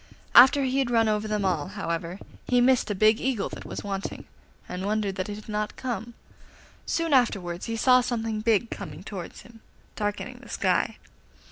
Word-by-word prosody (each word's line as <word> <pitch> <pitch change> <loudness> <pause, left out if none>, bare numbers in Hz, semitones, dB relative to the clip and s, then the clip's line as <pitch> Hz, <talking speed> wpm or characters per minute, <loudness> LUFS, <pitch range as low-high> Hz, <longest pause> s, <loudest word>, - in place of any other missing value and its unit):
After 265 +3 +8
he 265 +1 0
had 265 -3 +1
run 230 -2 +3
over 215 0 0
them 210 -2 -1
all, 175 -4 0
however, 175 -2 -4 0.3
he 245 - +3
missed 250 -1 +3
a 205 - -1
big 215 +3 +4
Eagle 250 -6 -1
that - - -9
was - - -6
wanting, 195 -1 -5 0.4
and 180 +1 -5
wondered 210 -2 0
that 190 +1 -3
it 205 - -4
had 210 - -11
not 210 -1 -3
come. 235 -2 -5 0.7
Soon 330 -2 0
afterwards 195 -9 +1
he 230 - -2
saw 255 +2 +5
something 225 -3 -2
big 225 0 +2
coming 150 +3 -7
towards 190 -4 -7
him, 230 -1 -16 0.4
darkening 205 -1 -3
the - - -14
sky. - - 0
215 Hz, 180 wpm, -26 LUFS, 195-240 Hz, 0.7 s, After